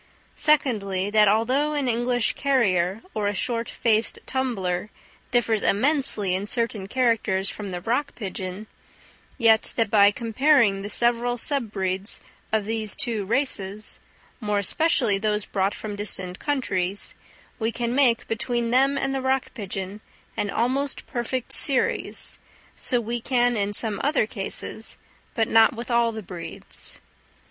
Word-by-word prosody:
Secondly, 205 -10 +1
that 215 -1 +5
although 255 +8 +2
an 285 -3 -1
English 245 0 +1
carrier 205 -8 +1
or 210 -2 -1
a 205 - -1
short 235 +1 -2
faced 225 -1 +1
tumbler 210 -8 -2 0.4
differs 225 -3 +1
immensely 220 -5 +2
in 190 +2 -2
certain 230 -4 -2
characters 220 -5 +1
from 210 -2 -7
the 180 -1 -5
rock 275 +8 -1
pigeon, 190 -1 -5 0.7
yet 225 -3 +4
that 225 -3 0
by 205 -2 +7
comparing 230 -1 +2
the 205 - -5
several 240 +2 +2
sub 250 -3 0
breeds 190 0 -1 0.3
of 215 -2 +1
these 220 -1 -1
two 225 -5 -1
races, 215 -4 0 0.4
more 210 -3 -1
especially 225 - +2
those 210 0 0
brought 195 0 -1
from 210 -1 -6
distant 190 -3 -3
countries, 200 -9 -2 0.5
we 225 0 0
can 235 0 -2
make, 255 -4 +3
between 235 +1 -1
them 270 +3 +3
and 270 0 -1
the 270 - -1
rock 265 0 0
pigeon, 200 -2 -5 0.3
an 205 - -1
almost 260 +6 -1
perfect 245 +1 -3
series; 270 -3 +2 0.4
so 245 - +2
we 235 +1 -3
can 245 -1 +2
in 205 -1 0
some 210 0 0
other 290 -5 +2
cases, 220 +1 -4 0.4
but 225 -3 +1
not 225 +1 +5
with 235 +2 -6
all 235 -1 +3
the 220 -1 -7
breeds. 170 -3 -5
225 Hz, 140 wpm, -24 LUFS, 200-250 Hz, 0.7 s, by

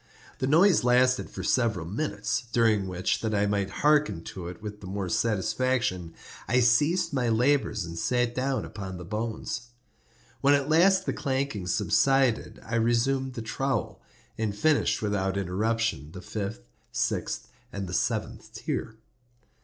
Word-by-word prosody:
The 130 - 0
noise 170 +3 +5
lasted 125 +1 +3
for - - -7
several 110 -9 +1
minutes, 100 - -2
during 110 -5 +3
which, 90 +1 -1
that 110 -1 -1
I 100 0 +2
might 100 -1 0
hearken 145 - +2
to 90 -3 -7
it 90 - -8
with 105 -1 -8
the 95 - -8
more 95 -1 -3
satisfaction, 110 -4 0 0.3
I 125 - +3
ceased 145 +10 +3
my 125 -3 +1
labors 120 -3 +2
and 85 0 -7
sat 120 +2 +1
down 130 +1 -1
upon 95 -3 -7
the 90 - -8
bones. 110 +4 -3 0.8
When 140 +1 +5
at 140 0 -1
last 190 +4 +4
the - - -1
clanking 130 -9 -2
subsided, 135 +6 +2
I 115 +1 -1
resumed 125 +3 +1
the 115 - -4
trowel, 130 - -2 0.4
and 105 -2 -1
finished 155 -3 +2
without 100 -2 0
interruption 100 -4 -1
the 90 - -8
fifth, 100 - -4
the - - -15
sixth, - - -1 0.2
and 100 -1 -4
the 90 - -6
seventh - - -2
tier. 110 - -4
115 Hz, 155 wpm, -27 LUFS, 100-130 Hz, 0.8 s, noise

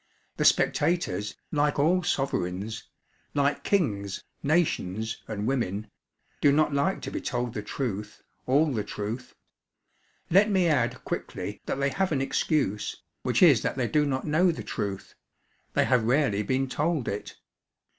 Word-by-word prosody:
The - - +1
spectators, 105 - +2 0.2
like 145 -1 +1
all 170 +6 +3
sovereigns 110 - -2 0.5
like 140 0 +1
kings, 100 - 0 0.2
nations, 115 - 0
and 105 -1 -3
women 110 -5 -1 0.5
do 145 - +6
not 150 0 +3
like 140 +7 +1
to - - -4
be - - -3
told 120 -2 -2
the 105 - -3
truth, 105 -2 -4 0.2
all 145 +4 +3
the 110 -3 -1
truth. 105 +5 -5 1.0
Let 200 +5 +6
me 190 -3 +3
add 130 -7 +1
quickly - - -4
that - - -2
they 140 0 +2
have 190 +5 0
an 145 - +1
excuse, 135 -5 -1 0.2
which - - +2
is - - +7
that - - -1
they 125 -2 +1
do 150 +2 +2
not 130 -1 -1
know 160 +5 +3
the 160 - -6
truth; 100 -3 -4 0.6
they - - +3
have 125 -3 +3
rarely 125 -4 +2
been 130 +5 0
told 150 0 -1
it. 100 +1 -4
135 Hz, 150 wpm, -27 LUFS, 105-150 Hz, 1.0 s, is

